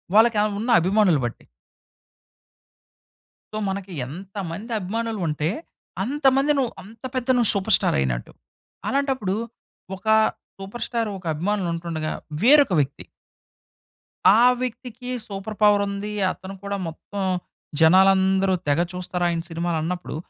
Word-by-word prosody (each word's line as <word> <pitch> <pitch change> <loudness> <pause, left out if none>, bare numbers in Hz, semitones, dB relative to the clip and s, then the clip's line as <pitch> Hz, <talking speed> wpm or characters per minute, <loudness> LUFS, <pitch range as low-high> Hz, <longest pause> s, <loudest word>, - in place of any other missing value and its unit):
వాళ్ళకి 225 0 +6 0.2
ఉన్న 230 +4 -3
అభిమానులు 185 -3 +3
బట్టి. 120 - -6 2.1
సో - - -3
మనకి 195 -1 -5
ఎంతమంది 195 - -7
అభిమానులుంటే 190 -7 -2 0.5
అంతమంది 270 +3 +2
నువ్వు 255 -4 0
అంత 220 +4 -16
పెద్ద 255 -1 -2
నువ్వు 235 -3 +4
సూపర్ 200 +1 +4
స్టార్ - - 0
అయినట్టు. 65 -3 -2 0.6
అలాంటప్పుడు 265 -8 0 0.6
ఒక 195 - -17 0.5
సూపర్ 200 +5 -6
స్టార్ 230 -3 -1
ఒక 185 - -14
అభిమానులు 185 +3 -1
ఉంటుండగా 165 -2 -3 0.3
వేరొక 280 -3 +6
వ్యక్తి 140 -1 -2 1.3
ఆ - - +5 0.2
వ్యక్తికి 250 0 -5 0.2
సూపర్ 200 +1 -6
పవర్ 205 -1 +5
ఉంది. 200 +1 -4 0.2
అతను 190 +1 -9
కూడా 200 0 -3
మొత్తం 190 +5 -7 0.6
జనాలందరూ 190 +2 +5
తెగ 145 +2 +2
చూస్తారాయన 175 -2 -1
సినిమాలన్నప్పుడు 170 +1 -3
195 Hz, 110 wpm, -23 LUFS, 175-225 Hz, 2.1 s, వాళ్ళకి